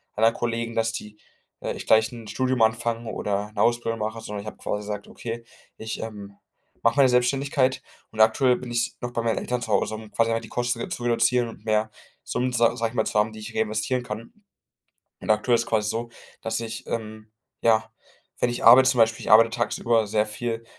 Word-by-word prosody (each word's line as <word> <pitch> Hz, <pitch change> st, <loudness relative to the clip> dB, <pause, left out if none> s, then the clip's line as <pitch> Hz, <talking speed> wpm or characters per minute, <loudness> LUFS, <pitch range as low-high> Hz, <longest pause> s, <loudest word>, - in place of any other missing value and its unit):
anderen 115 Hz, +2 st, +3 dB
Kollegen, 115 Hz, 0 st, -2 dB
dass 115 Hz, 0 st, 0 dB
die 105 Hz, -1 st, -7 dB, 0.4 s
äh, -, -, -3 dB
ich -, -, -8 dB
gleich 110 Hz, +1 st, +4 dB
'n 115 Hz, -3 st, -10 dB
Studium 130 Hz, +3 st, 0 dB
anfange 115 Hz, +1 st, +1 dB
oder 105 Hz, +1 st, -2 dB
'ne -, -, -1 dB
Ausbildung 120 Hz, -1 st, +1 dB
mache, 110 Hz, +1 st, -3 dB
sondern 105 Hz, -2 st, -6 dB
ich 105 Hz, -, -11 dB
habe -, -, -7 dB
quasi 105 Hz, -, -3 dB
gesagt: 105 Hz, 0 st, -6 dB
„Okay, 115 Hz, 0 st, -6 dB, 0.3 s
ich, 110 Hz, 0 st, -5 dB
ähm, 100 Hz, -3 st, -8 dB, 0.5 s
mache 115 Hz, 0 st, +3 dB
meine 135 Hz, -2 st, +6 dB
Selbständigkeit“ 130 Hz, +1 st, +1 dB, 0.3 s
und 110 Hz, -, 0 dB
aktuell 125 Hz, +3 st, +5 dB
bin 125 Hz, -1 st, -8 dB
ich 120 Hz, 0 st, +1 dB
s -, -, -34 dB
noch 120 Hz, 0 st, -4 dB
bei 115 Hz, -, -2 dB
meinen 115 Hz, -1 st, 0 dB
Eltern 125 Hz, -1 st, -2 dB
zu 110 Hz, -, -5 dB
Hause, 105 Hz, +1 st, +1 dB
um 110 Hz, -1 st, -10 dB
quasi 115 Hz, +2 st, +1 dB
halt 115 Hz, 0 st, -1 dB
die -, -, -9 dB
Kosten 120 Hz, -1 st, -1 dB
jetzt -, -, -3 dB
zu 120 Hz, -, -9 dB
reduzieren 120 Hz, 0 st, +2 dB
und 110 Hz, -1 st, -13 dB
mehr 110 Hz, 0 st, +1 dB, 0.3 s
Summen 125 Hz, 0 st, -2 dB
sa 120 Hz, 0 st, +3 dB
sage 115 Hz, -1 st, -1 dB
ich -, -, -14 dB
mal 110 Hz, -, +1 dB
zu 105 Hz, -, +1 dB
haben, 110 Hz, +1 st, +1 dB
die 110 Hz, -, -10 dB
ich 105 Hz, -, -9 dB
reinvestieren 110 Hz, +4 st, 0 dB
kann 115 Hz, 0 st, -7 dB, 0.9 s
und -, -, -5 dB
aktuell 110 Hz, +3 st, +3 dB
ist 115 Hz, -, +3 dB
es -, -, -9 dB
quasi 105 Hz, -2 st, 0 dB
so, 115 Hz, +2 st, -3 dB, 0.3 s
dass 115 Hz, -, -2 dB
ich, 115 Hz, 0 st, -6 dB
ähm, 110 Hz, -1 st, -5 dB, 0.3 s
ja, 110 Hz, -1 st, +3 dB, 0.5 s
wenn 120 Hz, -, +2 dB
ich 120 Hz, -, -4 dB
arbeite 130 Hz, +3 st, +8 dB
zum 125 Hz, -, -1 dB
Beispiel, 115 Hz, 0 st, +3 dB
ich -, -, -4 dB
arbeite 115 Hz, +1 st, +8 dB
tagsüber 115 Hz, -1 st, +1 dB
sehr 105 Hz, +1 st, +1 dB
viel 115 Hz, +1 st, -4 dB
115 Hz, 220 wpm, -25 LUFS, 110-120 Hz, 0.9 s, arbeite